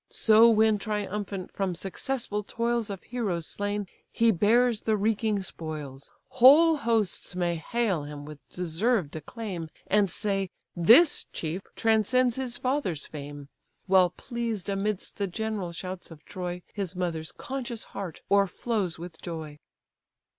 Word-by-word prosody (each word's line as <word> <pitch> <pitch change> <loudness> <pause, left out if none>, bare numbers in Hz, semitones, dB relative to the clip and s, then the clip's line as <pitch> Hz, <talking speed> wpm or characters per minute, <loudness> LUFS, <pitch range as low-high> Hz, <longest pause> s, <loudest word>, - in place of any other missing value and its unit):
So 225 +1 +6
when 220 -1 +4
triumphant 205 -2 -3
from 190 -3 -1
successful 210 +4 -2
toils 235 +1 -1
Of 195 -2 -6
heroes 205 -9 -2
slain 205 +2 -2 0.3
he 230 0 +4
bears 225 +4 +3
the 220 -1 +1
reeking 210 -1 +1
spoils, 150 -6 -7 0.2
Whole 285 +6 +7
hosts 225 -7 0
may 175 -2 0
hail 200 -1 0
him 145 0 -8
with 150 -1 -10
deserved 180 0 0
acclaim, 175 - -6 0.2
And 205 -1 +3
say, 195 -1 -1 0.3
'This 240 - +6
chief 165 +4 -4
transcends 225 +3 +3
his 255 -2 -2
father's 255 - -1
fame:' 145 -1 -8 0.4
While 185 -2 +5
pleased 230 -1 -4
amidst 200 0 -2
the 200 -2 -1
general 210 -2 -3
shouts 185 +2 -7
of 160 -2 -14
Troy, 180 -2 -5
His 195 -3 -3
mother's 170 -3 -2
conscious 255 -5 -5
heart 185 -5 -6
o'erflows 200 -1 +1
with 170 -1 -9
joy." 155 -3 -6
200 Hz, 130 wpm, -27 LUFS, 175-225 Hz, 0.4 s, Whole